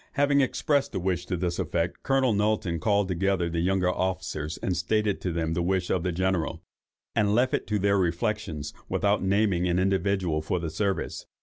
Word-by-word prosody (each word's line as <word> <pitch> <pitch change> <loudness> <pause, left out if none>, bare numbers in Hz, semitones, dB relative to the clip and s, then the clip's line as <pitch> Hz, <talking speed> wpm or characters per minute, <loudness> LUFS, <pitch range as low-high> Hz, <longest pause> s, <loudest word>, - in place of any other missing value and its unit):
Having 140 0 +3
expressed 140 +1 0
a - - 0
wish 90 -1 -1
to 90 - -1
this 85 0 -2
effect, 85 0 -1
Colonel 135 -3 +2
Knowlton 105 -5 0
called 100 +4 +2
together 90 -1 0
the 85 - -1
younger 90 +1 +1
officers, 90 -4 -2 0.2
stated 105 +3 0
to 90 - -2
them 80 -1 -1
the 85 - 0
wish 90 0 0
of 90 - +1
the 90 +1 -1
General, 95 -1 -1 0.5
and 105 -2 +2
left 125 +2 +2
it - - -1
to 105 - 0
their 100 0 +2
reflections, 85 -4 -2 0.2
without 100 +1 +1
naming 95 -2 +2
any 85 +1 +2
individual 95 -4 +1
for 90 - -1
the 80 -2 -4
service. 100 +3 -2
95 Hz, 185 wpm, -27 LUFS, 85-105 Hz, 0.5 s, Having